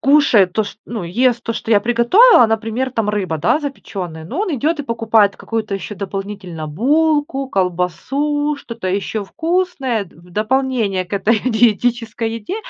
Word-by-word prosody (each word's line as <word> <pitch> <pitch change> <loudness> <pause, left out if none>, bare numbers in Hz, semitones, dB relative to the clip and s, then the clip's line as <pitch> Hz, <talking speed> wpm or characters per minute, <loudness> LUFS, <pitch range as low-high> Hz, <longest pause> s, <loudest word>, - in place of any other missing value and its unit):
кушает 270 -10 +4
то 220 - +2
ш 200 - -8
ну, 230 -4 -5
ест 240 +7 +1
то, 230 - -1
что 225 - -5
я 205 - +6
приготовила, 240 - +5
например, 225 +4 -1
там 225 -4 -1
рыба, 190 -6 -2
да, 175 - +2
запечённая. 185 - -6
Но 275 - -4
он 380 -7 -1
идёт 305 +4 0
и - - -4
покупает 225 -4 +2
какую-то 220 -3 -3
ещё 195 +2 -5
дополнительно 195 -4 -6
булку, 285 - +1
колбасу, 265 - -1
что-то 230 -7 -6
ещё 200 +3 -2
вкусное 325 - -1
д 180 - -21
в 175 +2 -18
дополнение 215 -2 0
к 180 - -21
этой 205 +3 +2
диетической 230 -1 +1
еде. 230 - -5
225 Hz, 160 wpm, -18 LUFS, 195-270 Hz, -, я